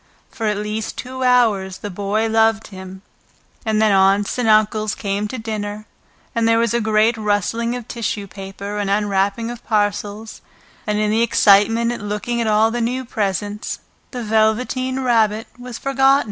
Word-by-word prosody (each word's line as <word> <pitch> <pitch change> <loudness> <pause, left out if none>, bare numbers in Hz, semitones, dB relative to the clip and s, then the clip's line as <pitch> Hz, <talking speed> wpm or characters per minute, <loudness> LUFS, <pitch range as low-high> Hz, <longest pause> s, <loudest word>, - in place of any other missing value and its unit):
For 225 -3 -3
at 210 -1 0
least 210 +1 -4
two 255 +2 -5
hours 215 -7 +2
the 205 - -6
Boy 205 +4 -1
loved 225 0 +2
him, 190 -1 -10 0.6
and 220 -1 0
then 215 -1 +4
Aunts 195 +4 +3
and 235 -3 +1
Uncles 215 0 +3
came 200 +1 -2
to 255 - -6
dinner, 215 -2 -5 0.5
and 230 -1 +1
there 230 0 +4
was 230 -1 +1
a 235 - +1
great 220 +1 +3
rustling 220 +3 0
of 245 -2 -7
tissue 215 -3 -3
paper 195 +1 -7
and 200 -1 -1
unwrapping 205 +2 0
of 240 - -9
parcels, 210 0 -2 0.5
and 210 0 0
in 210 0 +1
the 220 +1 +2
excitement 225 +1 +4
of 240 - -5
looking 210 +3 -2
at 230 - -1
all 215 +1 +3
the 240 +1 -2
new 250 +3 -1
presents 205 -2 -3 0.3
the 245 -2 -5
Velveteen 245 +4 +1
Rabbit 225 -3 +2
was 245 -2 -7
forgotten. 270 0 +3
215 Hz, 170 wpm, -20 LUFS, 205-235 Hz, 0.6 s, then